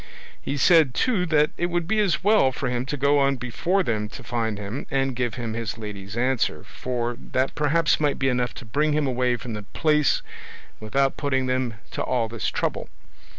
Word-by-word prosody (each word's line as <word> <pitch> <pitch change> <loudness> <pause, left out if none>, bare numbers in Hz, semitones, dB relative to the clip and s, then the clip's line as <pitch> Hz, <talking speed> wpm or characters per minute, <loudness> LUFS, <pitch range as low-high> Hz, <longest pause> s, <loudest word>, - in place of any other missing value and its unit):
He 145 - -3
said, 155 -3 +5
too, 205 -8 +1
that 150 -1 +3
it 175 - 0
would 175 -1 -1
be 220 +3 +1
as 195 -5 +1
well 205 -10 +4
for 130 +1 -3
him 125 +1 -2
to 145 0 -3
go 140 +1 +3
on 140 0 +3
before 165 - 0
them 105 -6 -1
to - - -10
find 115 -3 -2
him, 105 +5 -5
and 135 -1 0
give 120 -2 -1
him 115 -3 -4
his 115 0 -4
lady's 105 -1 -7
answer; 125 -11 0
for 120 -1 -3 0.2
that 130 +1 +1
perhaps 155 +2 +2
might 145 -2 +1
be 135 - 0
enough 125 -1 0
to 125 - -9
bring 150 +7 +1
him 150 0 +1
away 125 -1 +1
from 120 0 -6
the 105 - -4
place 150 +7 +1 0.6
without 135 +5 0
putting 130 -3 0
them 130 -2 -1 0.2
to - - -3
all 120 -3 0
this 115 -1 -4
trouble. - - -2
130 Hz, 200 wpm, -24 LUFS, 120-150 Hz, 0.6 s, said